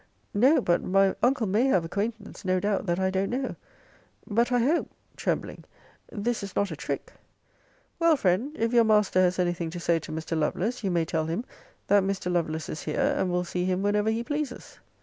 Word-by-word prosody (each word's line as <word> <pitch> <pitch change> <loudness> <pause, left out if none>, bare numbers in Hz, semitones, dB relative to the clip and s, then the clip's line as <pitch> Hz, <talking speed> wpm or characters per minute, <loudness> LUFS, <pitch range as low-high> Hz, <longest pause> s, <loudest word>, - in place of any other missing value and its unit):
No; 260 +10 +4
but 175 0 +2
my 195 +1 +3
uncle 250 -2 +2
may 210 +6 +2
have 185 -11 +2
acquaintance, 210 +5 -4
no 185 -1 +1
doubt, 205 +1 -1
that 175 +1 0
I 190 0 +1
don't 190 +1 0
know. 260 +2 -2 0.7
But 235 +3 +1
I 245 - +3
hope 280 +8 +1 0.3
[trembling] - - -3 0.5
this 230 +2 -2
is 195 -2 -7
not 200 - 0
a - - -4
trick. - - -5 0.9
Well, 335 -1 +5
friend, 200 +7 +1
if 230 +1 0
your 235 -1 +6
master 210 -4 +3
has 180 0 +2
anything 175 -2 -1
to 175 +2 -6
say 170 -1 +1
to - - -9
Mr. 160 +1 -3
Lovelace, 190 +10 -1
you 195 - 0
may 170 -2 +1
tell 160 -1 -1
him, 175 +10 -2 0.4
that 205 0 +4
Mr. 190 -2 -2
Lovelace 160 -2 -1
is 155 - -5
here; 280 +1 0
and 190 -10 0
will 180 0 0
see 180 0 -2
him 185 +1 0
whenever 210 +1 +2
he 225 +1 -1
pleases. 290 -1 -5
195 Hz, 200 wpm, -27 LUFS, 180-235 Hz, 0.9 s, your